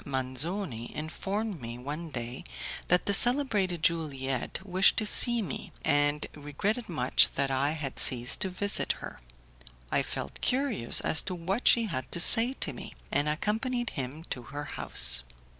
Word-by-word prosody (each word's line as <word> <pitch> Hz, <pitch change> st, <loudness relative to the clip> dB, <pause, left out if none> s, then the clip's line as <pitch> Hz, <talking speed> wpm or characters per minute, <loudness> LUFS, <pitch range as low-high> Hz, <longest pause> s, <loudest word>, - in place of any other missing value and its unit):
Manzoni 130 Hz, -, -3 dB
informed 195 Hz, -, -5 dB
me 115 Hz, 0 st, -8 dB
one 150 Hz, +6 st, -7 dB
day 120 Hz, -3 st, -7 dB, 0.4 s
that 180 Hz, +1 st, +2 dB
the 200 Hz, -, 0 dB
celebrated 210 Hz, -, +4 dB
Juliette 140 Hz, -2 st, -2 dB
wished 190 Hz, 0 st, +2 dB
to 215 Hz, -, 0 dB
see 240 Hz, +2 st, +3 dB
me, 160 Hz, -, -7 dB
and 145 Hz, +1 st, 0 dB
regretted 190 Hz, -, -4 dB
much 130 Hz, -7 st, +3 dB
that 135 Hz, 0 st, -1 dB
I 140 Hz, +3 st, 0 dB
had 145 Hz, -4 st, -5 dB
ceased 120 Hz, -1 st, +6 dB
to 190 Hz, -, -1 dB
visit 200 Hz, +2 st, -1 dB
her. -, -, -11 dB, 0.7 s
I -, -, +1 dB
felt 70 Hz, -, -7 dB
curious 250 Hz, -, +3 dB
as 160 Hz, -, +2 dB
to 185 Hz, -, -6 dB
what 190 Hz, +7 st, -3 dB
she 230 Hz, -1 st, +5 dB
had 130 Hz, -, -6 dB
to -, -, -3 dB
say 230 Hz, +8 st, +7 dB
to -, -, 0 dB
me, -, -, -9 dB, 0.2 s
and 145 Hz, +1 st, 0 dB
accompanied 225 Hz, -, -2 dB
him 140 Hz, +4 st, -6 dB
to 125 Hz, -, -4 dB
her 145 Hz, +4 st, -8 dB
house. 65 Hz, -, +1 dB
160 Hz, 160 wpm, -28 LUFS, 135-205 Hz, 0.7 s, say